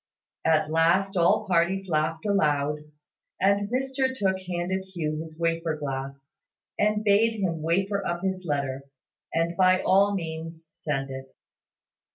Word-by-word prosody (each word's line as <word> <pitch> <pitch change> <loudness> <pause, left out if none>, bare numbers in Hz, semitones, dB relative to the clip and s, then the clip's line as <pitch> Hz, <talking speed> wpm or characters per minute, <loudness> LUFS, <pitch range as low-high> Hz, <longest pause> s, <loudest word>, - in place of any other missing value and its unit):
At 155 -1 +2
last 175 +5 +2
all 175 -1 +3
parties 190 +2 +1
laughed 160 +1 -1
aloud, 150 -7 +1 0.6
and 200 +1 +2
Mr 265 +1 -1
Tooke 190 -3 +1
handed 180 +2 -2
Hugh 160 -5 -3
his 160 -1 -10
wafer 165 -1 0
glass, 135 -1 -6 0.5
and 210 +1 +2
bade 215 +2 +3
him 170 -5 -1
wafer 195 +5 0
up 175 0 -3
his 190 -1 -2
letter, 140 -4 -2 0.5
and 165 +1 0
by 185 +1 +4
all 200 +2 +3
means 165 -2 -6
send 135 -3 -3
it. 135 0 -9
170 Hz, 135 wpm, -26 LUFS, 155-195 Hz, 0.6 s, by